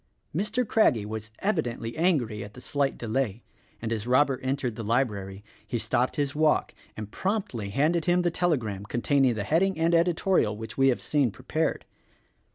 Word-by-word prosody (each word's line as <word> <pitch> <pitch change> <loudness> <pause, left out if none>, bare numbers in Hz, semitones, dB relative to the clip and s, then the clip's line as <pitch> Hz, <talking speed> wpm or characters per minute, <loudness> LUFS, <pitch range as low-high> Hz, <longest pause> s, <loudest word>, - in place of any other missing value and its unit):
Mr. 210 +6 0
Craggie 125 - +3
was 110 0 -6
evidently 125 - -1
angry 135 - +1
at 105 - -11
the - - -9
slight 140 +1 -1
delay, 115 -1 -2 0.4
and 115 0 -2
as 110 0 -4
Robert 130 +1 +3
entered 130 -3 -2
the 115 - -5
library 105 -4 -1 0.2
he 120 - -1
stopped 125 +2 0
his 145 -2 -1
walk 155 0 +2 0.2
and 105 -1 -6
promptly 190 - -2
handed 155 +9 +1
him 180 0 +3
the 175 - +1
telegram 125 - 0
containing 125 +3 +2
the 105 - -2
heading 170 - +2
and 165 +1 +2
editorial 170 - +2
which 110 0 -7
we 135 0 +4
have 130 - +1
seen 145 -5 +2
prepared. 95 - -2
130 Hz, 165 wpm, -27 LUFS, 110-165 Hz, 0.4 s, we